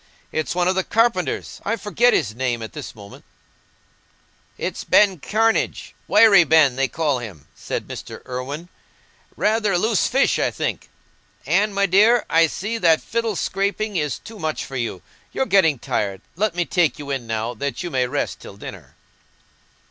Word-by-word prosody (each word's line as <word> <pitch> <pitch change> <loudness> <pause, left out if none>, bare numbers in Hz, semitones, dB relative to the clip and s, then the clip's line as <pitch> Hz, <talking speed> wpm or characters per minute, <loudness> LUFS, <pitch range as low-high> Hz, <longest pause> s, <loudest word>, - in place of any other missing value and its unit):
It's 155 -1 -2
one 180 0 +1
of 185 - +3
the 190 0 0
carpenters—I 220 - 0
forget 235 +3 +2
his 110 - 0
name 120 -1 -2
at 110 - -8
this 150 -5 -8
moment." 100 -2 -13 1.3
"It's - - -4
Ben 195 -5 +4
Cranage—Wiry 215 0 +3
Ben, 155 -5 +4
they 135 +1 +1
call 150 -3 -1
him," 100 -12 -9
said - - -5
Mr. - - -8
Irwine; 135 +7 -6 0.7
"rather 215 -1 +1
a - - +3
loose 220 +3 +2
fish, 270 +2 +2
I - - +2
think. - - -4 0.6
Anne, 210 +2 +2
my 200 0 +1
dear, 215 +6 +4
I 165 0 +5
see 215 +8 -4
that 165 -5 +4
fiddle 230 -2 -2
scraping 200 +3 -2
is 150 -5 -1
too 220 -2 -12
much 155 -1 -3
for 135 - -9
you: 115 -7 -3 0.3
you're 265 - 0
getting 180 - +3
tired. 100 -4 -2
Let 200 0 0
me 175 -1 0
take 175 -3 +1
you 145 -2 -6
in 130 -4 -3
now, 115 +1 -2
that 140 +5 -4
you 175 - -5
may 130 -2 +1
rest - - -3
till - - -12
dinner." - - -10
170 Hz, 165 wpm, -21 LUFS, 130-210 Hz, 1.3 s, I